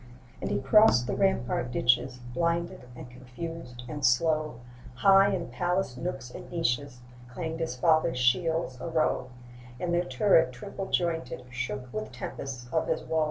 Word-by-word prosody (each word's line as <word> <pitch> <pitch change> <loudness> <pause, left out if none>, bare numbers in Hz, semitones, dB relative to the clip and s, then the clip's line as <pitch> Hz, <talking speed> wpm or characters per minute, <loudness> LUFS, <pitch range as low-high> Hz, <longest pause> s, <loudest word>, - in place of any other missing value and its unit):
And - - -2
he - - 0
crossed 135 - +5
the 125 - -2
rampart 160 -11 +1
ditches 125 +1 +2 0.2
Blinded, 170 -2 -1
and 125 - -9
confused, 125 0 -8
and 145 +2 -6
slow; 155 0 +2 0.3
High 195 +8 +6
in 170 -2 -4
palaced 180 -6 -1
nooks 130 -4 -5
and - - -10
niches 125 -6 -1 0.3
Clanged 160 +5 -4
his 160 -6 -2
fathers' 155 -2 +3
shields 145 +2 +1
a - - -4
row; 155 -5 0 0.5
And 175 -1 -1
their 175 +1 +2
turrets 170 - +3
triple 195 +6 -6
jointed 165 -8 -1
Shook 125 0 -4
with 110 0 -4
tempests 125 0 -6
of 160 - +1
his - - -1
woe. 160 - 0
145 Hz, 155 wpm, -28 LUFS, 125-170 Hz, 0.5 s, High